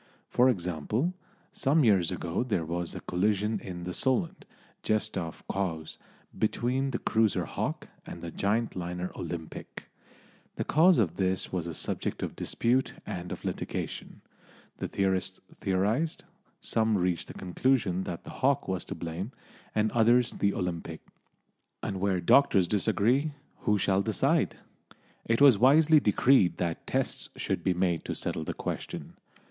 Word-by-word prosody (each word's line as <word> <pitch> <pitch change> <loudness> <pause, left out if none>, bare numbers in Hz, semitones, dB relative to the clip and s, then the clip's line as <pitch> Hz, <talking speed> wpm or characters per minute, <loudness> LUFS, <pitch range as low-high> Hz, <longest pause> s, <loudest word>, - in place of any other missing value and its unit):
For 125 +2 +5
example, 100 - -1 0.4
some 145 +3 +3
years 95 -8 +4
ago 85 +6 -2
there 105 -10 -1
was 85 +1 -3
a - - -6
collision 105 +3 0
in 90 -2 -7
the 90 +1 -4
Solent, 130 - 0 0.4
just 110 0 0
off 85 -4 -4
Cowes, 80 -5 -3 0.4
between 125 +5 0
the 125 - -1
cruiser 110 -3 +1
Hawke - - -3 0.2
and - - -8
the 85 - -5
giant 110 +7 0
liner 90 0 -4
Olympic. 80 -2 -6 0.7
The - - -2
cause 170 +4 +5
of 90 -6 +1
this 95 -1 0
was 85 -2 -1
a 85 - -5
subject - - -2
of - - -4
dispute 125 +3 0
and 90 0 -5
of - - -6
litigation; - - -4 0.6
the - - -3
theorists 95 -1 -1 0.2
theorised; 105 - 0 0.4
some 110 -1 +1
reached 90 -2 0
the - - -10
conclusion 95 -1 +1
that 85 - -5
the - - -9
Hawke 140 +1 +2
was 95 -2 -2
to 100 - -6
blame, 85 +6 -5 0.4
and 110 0 +2
others 120 +1 +4
the 100 - +1
Olympic; 85 -2 -4 0.8
and 95 - -3
where 95 -1 +1
doctors 95 -1 +5
disagree 110 - +1 0.3
who 105 -4 +2
shall 95 0 +2
decide? - - +1 0.7
It 115 +3 +1
was 135 -8 +8
wisely 150 +5 +6
decreed 105 -4 +4
that 85 -2 -3
tests - - -1
should - - -2
be 95 - +2
made 90 -2 +1
to - - -3
settle 80 - -2
the - - -4
question. - - -5
100 Hz, 150 wpm, -29 LUFS, 90-120 Hz, 0.8 s, was